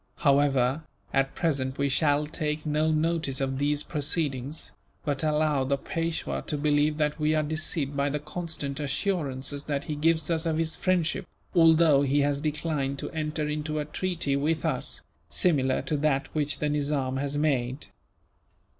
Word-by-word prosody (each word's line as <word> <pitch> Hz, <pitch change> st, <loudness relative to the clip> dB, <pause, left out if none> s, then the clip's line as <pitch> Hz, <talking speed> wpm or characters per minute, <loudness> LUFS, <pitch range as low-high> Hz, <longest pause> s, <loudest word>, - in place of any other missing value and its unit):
However, 140 Hz, -1 st, +3 dB, 0.3 s
at 135 Hz, 0 st, +1 dB
present 135 Hz, -6 st, -1 dB
we 140 Hz, -, +1 dB
shall 145 Hz, +1 st, +2 dB
take 150 Hz, 0 st, -3 dB
no 155 Hz, +1 st, +1 dB
notice 155 Hz, -3 st, +1 dB
of 135 Hz, -1 st, -1 dB
these 145 Hz, +1 st, +1 dB
proceedings; 145 Hz, -2 st, -2 dB, 0.3 s
but 145 Hz, -1 st, 0 dB
allow 150 Hz, -2 st, +2 dB
the 140 Hz, +1 st, 0 dB
Peishwa 160 Hz, -, -3 dB
to 150 Hz, -, -1 dB
believe 150 Hz, +1 st, +2 dB
that 150 Hz, 0 st, 0 dB
we 155 Hz, +1 st, +2 dB
are 155 Hz, -, +2 dB
deceived 150 Hz, -2 st, -2 dB
by 140 Hz, 0 st, +1 dB
the 145 Hz, -, -1 dB
constant 150 Hz, -2 st, -5 dB
assurances 145 Hz, -2 st, -2 dB
that 145 Hz, -1 st, -2 dB
he 155 Hz, -, -3 dB
gives 160 Hz, +1 st, +2 dB
us 165 Hz, 0 st, +1 dB
of 160 Hz, -1 st, 0 dB
his 160 Hz, 0 st, 0 dB
friendship, 180 Hz, -1 st, 0 dB, 0.3 s
although 165 Hz, -4 st, +6 dB
he 140 Hz, +1 st, +2 dB
has 140 Hz, 0 st, +1 dB
declined 150 Hz, -2 st, -1 dB
to -, -, -5 dB
enter 155 Hz, -1 st, -2 dB
into 150 Hz, +1 st, -2 dB
a 150 Hz, -, -1 dB
treaty 170 Hz, -2 st, -1 dB
with 155 Hz, +4 st, 0 dB
us, 140 Hz, -6 st, -1 dB, 0.3 s
similar 135 Hz, -8 st, +2 dB
to 145 Hz, +3 st, -1 dB
that 140 Hz, -2 st, 0 dB
which 150 Hz, -1 st, 0 dB
the 150 Hz, -, -1 dB
Nizam 140 Hz, -3 st, 0 dB
has 140 Hz, +1 st, -1 dB
made. 135 Hz, -3 st, 0 dB
150 Hz, 165 wpm, -27 LUFS, 140-155 Hz, 0.3 s, although